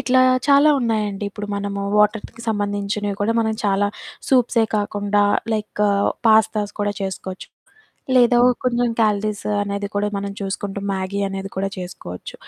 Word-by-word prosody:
ఇట్లా 255 +1 +3 0.3
చాలా 285 +2 +6
ఉన్నాయండి. 215 -4 -1
ఇప్పుడు 205 +1 -6
మనము 200 0 -3 0.2
వాటర్‍కి 215 +2 +1
సంబంధించినవి 205 -1 -2
కూడా, 220 +2 +2
మనం 220 -1 0
చాలా 200 0 +2 0.4
సూప్సే 245 -3 +3
కాకుండా, 205 0 0 0.3
లైక్ 210 -1 -4
ఆహ్, 200 0 +2 0.2
పాస్తాస్ 215 -1 +3
కూడా 205 0 0
చేసుకోవచ్చు. 190 -1 -5 0.7
లేదా 245 -1 +5
ఓ - - +6 0.2
కొంచెం 245 -1 +1
కాలరీస్ 210 -1 0 0.2
అనేది 200 0 -3
కూడా 205 0 +1
మనం 200 0 -4
చూసుకుంటూ, 195 0 -4
మ్యాగీ 190 +1 -3
అనేది 195 0 -5
కూడా 195 +1 0
చేసుకోవచ్చు. 175 - -8
205 Hz, 140 wpm, -21 LUFS, 200-220 Hz, 0.7 s, చాలా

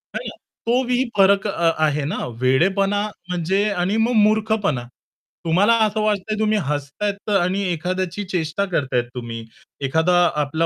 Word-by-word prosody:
है - - -1
ना? - - -7 0.3
तो 245 +3 +2
वी 250 +1 +2
फरक 195 0 +4
अ-आहे 155 -5 +1
ना 150 - -3 0.2
वेडेपणा 190 +10 +2 0.3
म्हणजे 180 +3 0
आणि 190 0 -1
मग 225 +2 +2
मूर्खपणा. 210 - +1 0.6
तुम्हाला 185 +7 +4
असं 215 +1 -1
वाटतंय 215 0 -1
तुम्ही 215 0 +2
हसतायेत 150 +9 -3
आणि 185 +2 0
एखाद्याची 185 +3 -2
चेष्टा 165 +2 -1
करताय 135 -5 +1
तुम्ही. 115 -2 -6 0.4
एखादा 160 +6 +2 0.3
आपला 160 +3 -1
185 Hz, 135 wpm, -21 LUFS, 155-205 Hz, 0.6 s, फरक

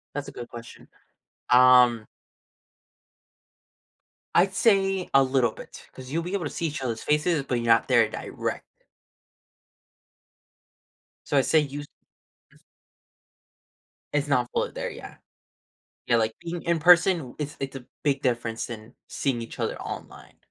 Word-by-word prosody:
That's 145 -1 -4
a - - -8
good 120 -1 -8
question. 115 0 -12 0.6
Um 125 -3 +6 2.3
I'd 190 +2 +3
say 195 -3 +2
a 135 0 +6
little 130 -3 +2
bit, - - -13
'cause 130 -1 -11
you'll 165 +4 -1
be 180 +3 -5
able 195 -4 -1
to 145 - -3
see 170 - -3
each 150 -2 -4
other's 115 -3 -3
faces, 150 0 +1
but 125 -2 -2
you're 120 0 -2
not 115 -1 +4
there - - +4
direct. - - -5 2.6
So - - 0
I 135 - +5
say 160 - +3
use 145 0 -5 0.7
Mm. - - -22 1.6
It's 145 0 0
not 125 -4 +1
fully - - -1
there - - -4
yet. - - -11 0.9
Yeah, 120 - +3
like, 110 -1 0
being 170 0 -5
in 170 -1 +1
person, 175 +2 +6
w 130 -5 -10
it's 150 +1 -5
it's 135 0 -4
a 130 - -9 0.2
big 140 -1 +1
difference 120 -3 -1
than 115 +1 -10
seeing 125 -4 -2
each 115 - -10
other - - -2
online. - - -9
135 Hz, 145 wpm, -25 LUFS, 120-165 Hz, 2.6 s, Um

